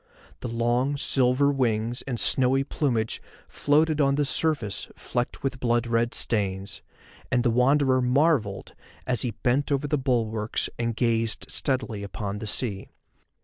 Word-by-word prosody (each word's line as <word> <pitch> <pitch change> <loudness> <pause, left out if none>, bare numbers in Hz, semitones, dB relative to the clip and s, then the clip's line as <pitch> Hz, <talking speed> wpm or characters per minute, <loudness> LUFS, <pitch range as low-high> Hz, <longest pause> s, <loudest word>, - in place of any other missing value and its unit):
The - - -5
long 120 +4 0
silver 135 +1 +2
wings 120 -3 -1
and 125 -4 -3
snowy 135 +1 +3
plumage 125 -6 -1 0.3
floated 155 +1 +2
on 140 -1 +3
the 145 0 +1
surface 145 - -1
flecked 120 0 -4
with 135 -2 -2
blood 120 -1 +1
red 115 0 0
stains, 100 -3 -1 0.5
and 120 -1 +2
the 120 - +2
Wanderer 130 +2 +3
marvelled 125 -5 +1 0.3
as 125 -4 0
he 125 - -1
bent 130 +6 0
over 140 +1 +1
the 145 0 0
bulwarks 115 -4 -1
and 115 -1 -1
gazed 115 -1 0
steadily 130 -6 -1
upon 100 0 -5
the 110 - -6
sea. 105 -2 -3
125 Hz, 145 wpm, -26 LUFS, 115-135 Hz, 0.5 s, snowy